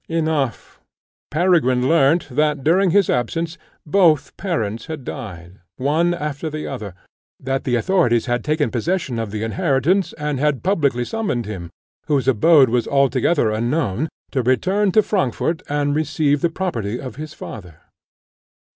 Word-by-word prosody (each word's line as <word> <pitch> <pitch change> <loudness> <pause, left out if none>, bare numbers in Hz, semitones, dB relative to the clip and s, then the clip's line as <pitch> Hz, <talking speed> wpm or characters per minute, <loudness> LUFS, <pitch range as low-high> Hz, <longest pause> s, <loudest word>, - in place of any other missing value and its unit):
Enough, 155 -6 -2 0.5
Peregrine 150 -7 +2
learnt 160 +1 +3
that, 150 +1 +1
during 185 +5 +3
his 200 +2 +3
absence, 165 +7 -1 0.3
both 165 -3 +3
parents 115 - -3
had 155 -4 -6
died, 90 -5 -8 0.2
one 160 +6 +1
after 150 -1 -4
the 155 0 -5
other; 105 -9 -6 0.4
that 135 +1 -3
the 125 - +1
authorities 120 - +2
had 120 -1 -1
taken 155 0 0
possession 135 -1 -1
of 115 -2 -3
the 105 +1 -4
inheritance, 135 - +1
and 150 -3 -3
had 150 -2 0
publicly 145 -10 +1
summoned 200 - -2
him, 95 -5 -6 0.4
whose 140 -3 +1
abode 135 +2 +5
was 120 0 0
altogether 135 -2 +2
unknown, 120 +3 -1 0.2
to 135 - 0
return 185 - +1
to 215 +3 +4
Frankfort 170 - -1
and 145 0 0
receive 150 -2 +1
the 170 - +2
property 125 - -3
of 130 -1 -8
his 155 0 -7
father. 90 -7 -10
145 Hz, 145 wpm, -20 LUFS, 120-165 Hz, 0.5 s, abode